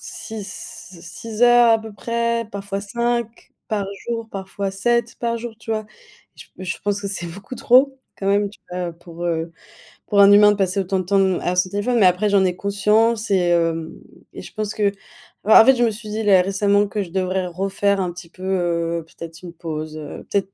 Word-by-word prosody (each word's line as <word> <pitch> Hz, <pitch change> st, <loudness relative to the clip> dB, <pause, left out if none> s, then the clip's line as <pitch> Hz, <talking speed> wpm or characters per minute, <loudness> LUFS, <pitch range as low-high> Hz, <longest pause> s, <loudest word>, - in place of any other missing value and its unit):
6 210 Hz, -4 st, -8 dB, 0.5 s
6 210 Hz, +6 st, -6 dB
heures 240 Hz, -1 st, +7 dB
à 225 Hz, -, +4 dB
peu 220 Hz, 0 st, -9 dB
près, 235 Hz, +1 st, -1 dB
parfois 200 Hz, -1 st, -4 dB
5 235 Hz, +2 st, -3 dB, 0.2 s
par 205 Hz, -2 st, -1 dB, 0.2 s
jour, 230 Hz, -1 st, -2 dB
parfois 195 Hz, 0 st, -4 dB
7 235 Hz, +4 st, 0 dB
par 235 Hz, -1 st, -1 dB
jour, 230 Hz, 0 st, -6 dB
tu 225 Hz, -, -9 dB
vois? 215 Hz, -1 st, -1 dB, 0.5 s
Je -, -, -13 dB
je 185 Hz, +1 st, -4 dB
pense 205 Hz, 0 st, 0 dB
que 200 Hz, -, -3 dB
c'est 185 Hz, -3 st, -4 dB
beaucoup 195 Hz, +8 st, -9 dB
trop, 265 Hz, +3 st, +4 dB, 0.2 s
quand 195 Hz, -, -4 dB
même, 200 Hz, +1 st, +2 dB
tu 205 Hz, -, -17 dB
vois, 180 Hz, 0 st, -3 dB
heu, -, -, -6 dB
pour, 170 Hz, 0 st, -10 dB
heu, 165 Hz, 0 st, -2 dB, 0.6 s
pour 200 Hz, -1 st, +4 dB
un 200 Hz, -, +8 dB
humain 205 Hz, 0 st, +7 dB
de -, -, 0 dB
passer 195 Hz, -1 st, 0 dB
autant 190 Hz, 0 st, -1 dB
de -, -, -2 dB
temps 190 Hz, -1 st, +2 dB
à 180 Hz, +1 st, -1 dB
son 180 Hz, -, +3 dB
téléphone. 215 Hz, +5 st, 0 dB
Mais 195 Hz, -, +5 dB
après, 185 Hz, +3 st, +3 dB
j'en 200 Hz, -1 st, +4 dB
ai 180 Hz, -1 st, 0 dB
conscience 210 Hz, +3 st, +1 dB
et 180 Hz, -3 st, +3 dB
heu, 165 Hz, -1 st, -1 dB, 0.3 s
et -, -, -9 dB
je -, -, -12 dB
pense 215 Hz, -1 st, -3 dB
que 205 Hz, -2 st, +1 dB, 0.5 s
bah, 215 Hz, +2 st, +8 dB
en -, -, +4 dB
fait, 265 Hz, -, +6 dB
je 240 Hz, -, +1 dB
me 230 Hz, -, +3 dB
suis 215 Hz, +1 st, -9 dB
dit, 220 Hz, +1 st, -3 dB
là, 195 Hz, -3 st, +5 dB
récemment, 200 Hz, +2 st, +2 dB
que 205 Hz, 0 st, -2 dB
je 175 Hz, -, -11 dB
devrais 185 Hz, 0 st, -1 dB
refaire 195 Hz, +2 st, 0 dB
un 180 Hz, -2 st, -2 dB
petit 175 Hz, -1 st, -11 dB
peu, 185 Hz, +2 st, -13 dB
heu, 170 Hz, -3 st, -1 dB
peut-être 165 Hz, 0 st, -11 dB
une 175 Hz, -, -8 dB
pause, 155 Hz, -2 st, -6 dB
heu. 150 Hz, -1 st, -8 dB
Peut-être 195 Hz, -1 st, -1 dB
200 Hz, 215 wpm, -21 LUFS, 180-220 Hz, 0.6 s, un